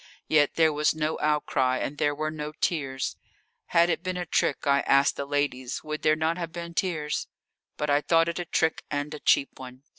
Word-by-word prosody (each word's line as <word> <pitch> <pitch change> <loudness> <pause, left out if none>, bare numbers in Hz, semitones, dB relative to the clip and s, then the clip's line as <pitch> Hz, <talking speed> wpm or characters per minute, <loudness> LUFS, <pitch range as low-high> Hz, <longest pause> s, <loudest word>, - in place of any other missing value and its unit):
Yet 150 -2 +3
there 160 -2 +4
was 150 +1 +1
no 155 0 -1
outcry, 140 -4 +1
and 145 +3 -4
there 145 0 +1
were 155 +1 -2
no 150 -1 -6
tears. 135 -5 -2 0.5
Had 170 0 +4
it 170 -1 -1
been 185 0 -3
a 180 - -3
trick 145 - 0
I 140 0 +4
ask 140 0 +3
the 140 - -5
ladies 140 -3 -2
would 155 0 -5
there 155 0 +3
not 160 +2 -1
have 170 -2 -4
been 170 0 -7
tears? 160 -5 -1 0.5
But 150 -1 -1
I 145 +1 +3
thought 165 +1 +3
it 170 +1 -3
a 175 - -3
trick 160 0 0
and 145 +1 -3
a 150 - -6
cheap 140 - +2
one. 130 0 -10
150 Hz, 210 wpm, -27 LUFS, 145-165 Hz, 0.5 s, there